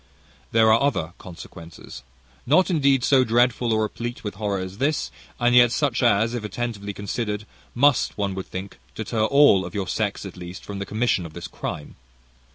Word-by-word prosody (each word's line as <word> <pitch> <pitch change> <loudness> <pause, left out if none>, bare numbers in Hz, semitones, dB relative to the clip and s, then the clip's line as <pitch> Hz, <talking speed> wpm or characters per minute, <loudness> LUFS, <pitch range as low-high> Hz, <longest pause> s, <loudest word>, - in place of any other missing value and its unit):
"There 110 -1 +5
are 115 - +3
other 110 - 0
consequences, 85 -2 -11 0.5
not 165 +7 +4
indeed 140 -5 +3
so 130 -1 +4
dreadful 120 0 +2
or 110 0 +2
replete 120 +3 -5
with 105 - -4
horror 100 -1 -2
as 95 +1 -7
this; 145 +3 0 0.3
and 120 0 +3
yet 120 -1 +6
such, 135 -2 0
as, 115 -1 +3
if 120 -3 -4
attentively 105 -1 -4
considered, 105 +1 -4 0.3
must, 140 +1 +3
one 100 -2 -1
would 95 0 -6
think, 95 -8 -7 0.2
deter 110 0 -1
all 140 -7 +5
of 90 +1 -8
your 100 -2 -2
sex 105 -1 -2
at 95 - -9
least 90 +1 -9
from 100 -1 -6
the 100 - -5
commission 110 -3 0
of 80 -2 -9
this - - -7
crime. 75 - -7
110 Hz, 180 wpm, -23 LUFS, 100-120 Hz, 0.5 s, yet